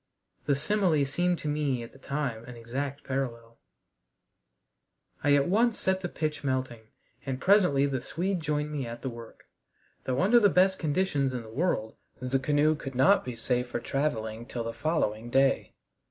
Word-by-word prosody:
The 140 - +3
simile 160 -1 +2
seemed 175 +5 0
to - - -5
me 145 -5 0
at 115 - -10
the 135 - -17
time 135 -5 -3
an 125 - -9
exact 135 +5 -4
parallel. 115 -4 -4 1.6
I 145 0 +5
at 140 -1 +3
once 225 +5 +2
set 190 0 0
the 175 - -3
pitch 155 -3 -3
melting, 130 -4 -2 0.4
and 130 -2 -3
presently 180 -8 +4
the 135 -3 -1
Swede 185 +6 -2
joined 150 -1 -2
me 140 -5 -3
at 115 0 -8
the 130 - -2
work, 115 -1 -11 0.6
though 130 +6 0
under 235 +5 +6
the 205 -3 +5
best 190 +1 +3
conditions 145 -5 0
in 120 - -4
the 110 - -12
world 130 -7 -1 0.2
the 130 +1 0
canoe 145 +3 +3
could 135 -3 -7
not 135 +2 +5
be 125 -2 -5
safe 125 +2 -1
for 120 - -3
traveling 115 -4 -2
till 120 -3 -4
the 115 0 -4
following 120 -5 -1
day. 135 +2 +2
140 Hz, 175 wpm, -28 LUFS, 125-155 Hz, 1.6 s, under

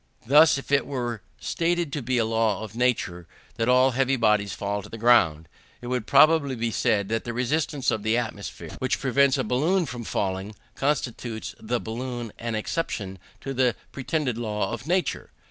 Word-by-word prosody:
Thus 150 +4 +6
if 140 - -8
it 140 -1 +3
were 120 -5 -3 0.2
stated 170 -3 -1
to 145 - -2
be 125 0 0
a 115 - +2
law 110 -1 0
of 110 0 -9
nature, 110 -9 0 0.3
that 115 +2 0
all 130 +1 +5
heavy 135 +1 +1
bodies 105 -4 +2
fall 100 0 -3
to - - -12
the 115 - -8
ground, 95 -10 +4 0.3
it - - -11
would 125 -4 -2
probably 145 -1 +5
be 115 -1 -2
said 100 -2 +1
that 115 0 -1
the 120 - -4
resistance 135 +3 0
of 110 -2 -1
the 110 +2 +1
atmosphere, 110 -4 -5
which 130 0 0
prevents 135 0 +3
a - - 0
balloon 165 +9 +1
from 125 -4 -6
falling, 95 0 -3 0.2
constitutes 120 -6 -2
the 120 +2 -2
balloon 120 0 -5
an 115 -1 -3
exception 105 - -3 0.2
to 135 - -4
that 125 -2 +2 0.2
pretended 130 -3 -2
law 105 -4 -2
of 120 +4 -6
nature. 180 -2 0
120 Hz, 180 wpm, -25 LUFS, 110-135 Hz, 0.3 s, Thus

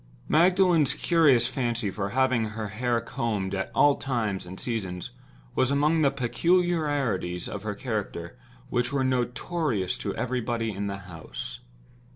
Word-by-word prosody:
Magdalen's 175 -2 +4
curious 150 -9 +4
fancy 120 -6 -1
for 100 0 -3
having 130 -1 +2
her 110 -1 -4
hair 120 +3 0
combed 100 -5 -2
at 95 -1 -2
all 145 -1 +5
times 110 -9 -2
and 95 +2 -8
seasons 95 -7 -3 0.4
was 130 - +2
among 150 +3 +3
the 140 - +5
peculiarities 140 - 0
of 100 - -5
her 105 -1 -3
character 100 -7 -4 0.4
which 120 +1 +1
were 140 -2 +1
notorious 125 - -1
to - - -3
everybody 120 -2 -1
in 100 0 -3
the 100 0 -3
house. 80 -3 -7
120 Hz, 140 wpm, -27 LUFS, 100-140 Hz, 0.4 s, all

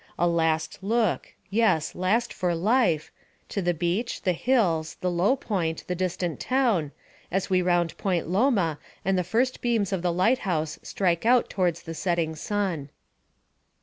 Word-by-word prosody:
A 175 - +2
last 160 -2 0
look 220 0 0 0.2
yes, 195 -8 +2
last 215 +7 0
for 180 -2 0
life 180 - +2 0.4
to 200 - -2
the 175 -1 +1
beach, 180 +8 -2
the 185 - +2
hills, 170 -7 +1
the 180 - 0
low 180 +9 +3
point, 180 - -2
the 180 - -2
distant 180 -2 -2
town, 230 - +1 0.4
as 190 +1 -1
we 185 -1 +4
round 175 -1 +1
Point 180 -5 0
Loma 190 - +2 0.3
and 195 0 +2
the 180 - +1
first 250 +7 0
beams 225 -5 +1
of 185 - -1
the 175 0 +1
light 190 +9 +2
house 160 -5 -2
strike 175 -4 0
out 245 +2 +3
towards 175 -3 0
the 165 - -6
setting 165 -1 -1
sun. 180 -5 -2
180 Hz, 160 wpm, -26 LUFS, 170-215 Hz, 0.4 s, we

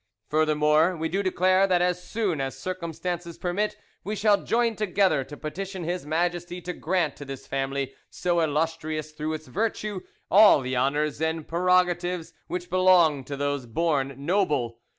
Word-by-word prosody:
Furthermore, 155 +2 +3
we 160 +1 -2
do 195 +4 0
declare 185 0 +3
that 180 -2 +3
as 180 0 0
soon 195 -10 -1
as 135 -1 -4
circumstances 170 +1 -4
permit 195 +4 -1 0.3
we 210 +2 -3
shall 205 0 +3
join 230 -1 +1
together 190 -8 +2
to 145 +3 -10
petition 185 +5 -5
His 175 -2 -3
Majesty 175 +2 -1
to 180 +1 -5
grant 175 -2 -1
to - - -8
this 135 -2 -8
family, 135 0 -2 0.2
so 175 -1 0
illustrious 155 0 -1
through 155 +1 -3
its 155 0 -6
virtue, 210 0 -2 0.3
all 205 -7 +7
the 130 0 -3
honours 145 +4 0
and 160 -1 -1
prerogatives 180 0 +1
which 180 0 -4
belong 180 -6 +4
to 140 +1 -5
those 145 -2 -2
born 140 0 0
noble. 145 - 0
170 Hz, 155 wpm, -26 LUFS, 150-185 Hz, 0.3 s, all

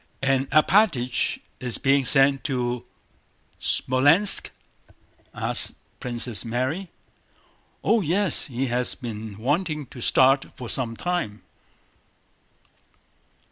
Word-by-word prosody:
"And 135 0 +1
Alpátych 155 - +2 0.2
is 125 -2 -4
being 140 -1 +2
sent 135 +1 +4
to 125 -3 -2 0.7
Smolénsk?" 145 +10 +3 0.8
asked - - -1 0.2
Princess 120 -2 -1
Mary. 130 +11 -3 0.9
"Oh, 225 -1 +3
yes, 185 +1 +1
he 130 0 -3
has 125 0 0
been 110 -4 -7
waiting 150 - -1
to 125 - -12
start 135 +3 +3
for 125 -2 -7
some 115 -3 -1
time." 175 -13 -3
135 Hz, 95 wpm, -24 LUFS, 120-155 Hz, 0.9 s, sent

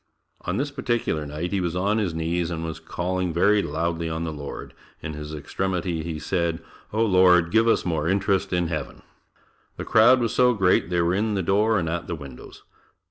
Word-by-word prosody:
On 90 +3 -1
this 140 +3 -2
particular 120 - -2
night 75 +5 -4
he 100 -2 0
was 85 -1 -2
on 100 +4 +1
his 100 -5 0
knees 85 +1 -1
and 80 -1 -4
was 80 -1 -5
calling 90 0 -2
very 100 +5 +3
loudly 85 -1 -2
on 80 +1 -3
the 80 -2 -3
Lord, 70 -1 -8 0.3
in 75 -1 -4
his 75 0 -7
extremity, 85 +2 -3
he 80 -1 -4
said, 85 0 -1 0.3
"Oh, 110 +2 +1
Lord 90 -4 +4
give 115 +3 +4
us 115 - +2
more 80 -3 -1
interest 95 +1 +1
in 90 -1 +1
Heaven." 80 -4 -5 0.7
The - - -5
crowd 120 +4 +5
was 115 -3 -1
so 125 -1 +4
great 90 -4 +2
they 90 -1 +1
were 85 +1 +1
in 105 +2 0
the 95 - -1
door 105 +5 +2
and 85 - -1
at 85 +1 -3
the 85 - -3
windows. 70 -5 -11
90 Hz, 200 wpm, -24 LUFS, 80-100 Hz, 0.7 s, crowd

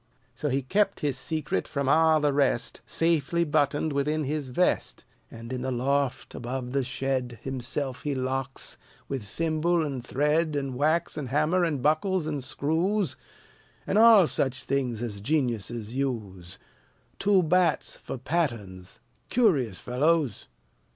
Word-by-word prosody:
So 150 +4 -3
he 135 +1 0
kept 195 +8 +1
his 145 -3 0
secret 155 - -2
from 140 -1 -2
all 160 +2 +5
the 145 -1 +1
rest, 135 -4 0
Safely 165 0 +1
buttoned 150 -1 +1
within 150 +2 0
his 145 -1 -3
vest; 175 +9 0 0.2
And 115 +2 -8
in 125 - -3
the 130 +1 -2
loft 135 +2 -1
above 125 +1 -4
the 135 0 +1
shed 130 -1 -2
Himself 130 0 -3
he 145 -2 -2
locks, 130 +1 -3 0.3
with 135 -2 -3
thimble 160 +7 0
and 135 -4 -4
thread 150 +5 +1
And 135 -2 -2
wax 155 +6 +1
and 135 -4 -5
hammer 155 +7 +2
and 150 -7 -1
buckles 160 +3 +2
and 145 -4 -2
screws, 165 +3 0 0.7
And 205 - +2
all 225 -4 +8
such 130 -4 0
things 125 -4 -1
as 105 -4 -4
geniuses 120 -4 -1
use; 105 -10 -4 0.6
Two 195 -2 +4
bats 170 0 +2
for - - -7
patterns, 115 - -3 0.3
curious 145 - +2
fellows! 140 - 0
140 Hz, 140 wpm, -27 LUFS, 125-160 Hz, 0.7 s, all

